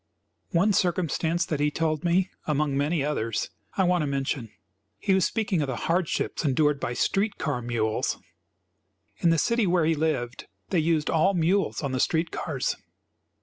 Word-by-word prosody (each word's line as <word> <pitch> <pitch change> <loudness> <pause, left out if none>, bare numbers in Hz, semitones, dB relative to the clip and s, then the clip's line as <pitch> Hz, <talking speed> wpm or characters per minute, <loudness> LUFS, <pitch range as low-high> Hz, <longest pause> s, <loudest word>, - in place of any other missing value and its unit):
One 195 +4 +3
circumstance 175 -2 +1
that 155 - -2
he 150 0 +2
told 155 +1 -1
me, 180 +2 +2 0.2
among 150 -2 +1
many 145 +1 +1
others, 115 -9 -2 0.3
I 190 - +4
want 180 -1 +2
to 150 - -1
mention. 135 -4 -2 0.5
He 195 - +1
was 190 -2 +3
speaking 205 -7 0
of 145 - -1
the 130 - -2
hardships 175 0 0
endured 145 0 +2
by 120 - -2
street 200 - 0
car 145 -5 -2
mules. 115 -2 -1 1.0
In 170 - +2
the 165 - +3
city 235 +4 +2
where 175 -2 +3
he 165 - +3
lived 145 -6 -2 0.2
they 180 - +2
used 160 -1 +1
all 185 +5 +3
mules 180 +1 +1
on 140 - -1
the 130 - -1
street 160 +5 +1
cars. - - -2
160 Hz, 170 wpm, -26 LUFS, 140-180 Hz, 1.0 s, I